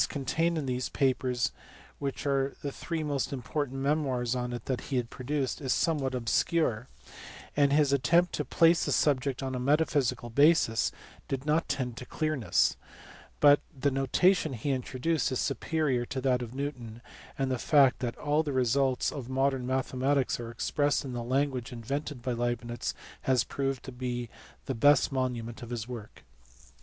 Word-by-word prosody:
369 140 -2 -4 0.2
contained 170 -1 0
in 150 - -2
these 125 -1 -2
papers, 130 -2 +1 0.5
which 140 0 -4
are 135 -1 +1
the 140 - -2
three 165 +2 -4
most 140 -4 -1
important 135 +1 -3
memoirs 135 -4 0
on 125 -1 -2
it 120 - -6
that 130 -3 -2
he 130 -3 +1
produced, 130 +4 -3
is 130 -3 -1
somewhat 140 -6 0
obscure, 125 0 +1 0.7
and 140 -1 +4
his 145 -1 +3
attempt 170 +7 +3
to 150 - -1
place 165 +5 +4
the - - -1
subject 135 -2 +1
on 130 -1 -3
a 125 - -2
metaphysical 135 -3 +1
basis 140 -4 +4 0.4
did 135 0 -3
not 155 +2 +1
tend 130 -4 -2
to 125 - -7
clearness; 155 -7 +1 0.6
but 145 0 +7 0.2
the 140 +2 +2
notation 150 +5 +2
he 125 +4 -2
introduced 135 +4 -1
is 130 - -1
superior 140 -1 0
to 130 - -4
that 125 -1 +1
of 120 +1 -7
Newton, 125 -5 -5 0.3
and 135 -1 0
the 130 - -1
fact 140 -2 +4
that 120 -3 -3
all 150 +1 +1
the 150 -2 -3
results 130 +1 +2
of 130 -4 -7
modern 135 -1 0
mathematics 130 +1 0
are 115 -1 -5
expressed 145 +5 0
in 130 - -5
the 120 - -3
language 130 0 -1
invented 135 +3 -4
by 125 - -1
Leib 120 0 -1
nitz 120 -1 -4 0.3
has 130 -3 +4
proved 135 -1 -3
the 120 -2 -3 0.4
best 145 +4 +4
monument 125 -3 -2
of 120 - -8
his 120 -2 -4
work. 120 -4 -9
130 Hz, 165 wpm, -29 LUFS, 125-145 Hz, 0.7 s, but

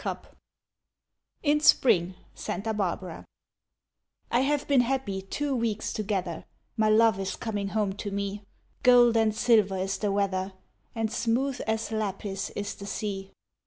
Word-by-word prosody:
VII - - -1 1.3
In 300 -1 +3
Spring, 185 - +4 0.2
Santa 215 +5 -3
Barbara 185 -4 -3 1.1
I 240 - +3
have 285 +2 0
been 275 -3 +5
happy 240 -6 -1
two 275 +8 -2
weeks 230 -3 -1
together, 190 -6 -2 0.3
My 215 -2 +2
love 220 -2 +4
is 195 0 -3
coming 205 -3 -3
home 205 -1 0
to 205 - -4
me, 200 0 -3 0.4
Gold 245 -2 +6
and 220 -1 +3
silver 215 -4 +3
is 190 +1 -2
the 205 -2 0
weather 195 -1 -1 0.4
And 225 -1 -1
smooth 250 +3 0
as 220 0 -1
lapis 200 -2 -3
is 205 0 -3
the 200 - -9
sea. 195 -2 -4
215 Hz, 140 wpm, -27 LUFS, 195-230 Hz, 1.3 s, Gold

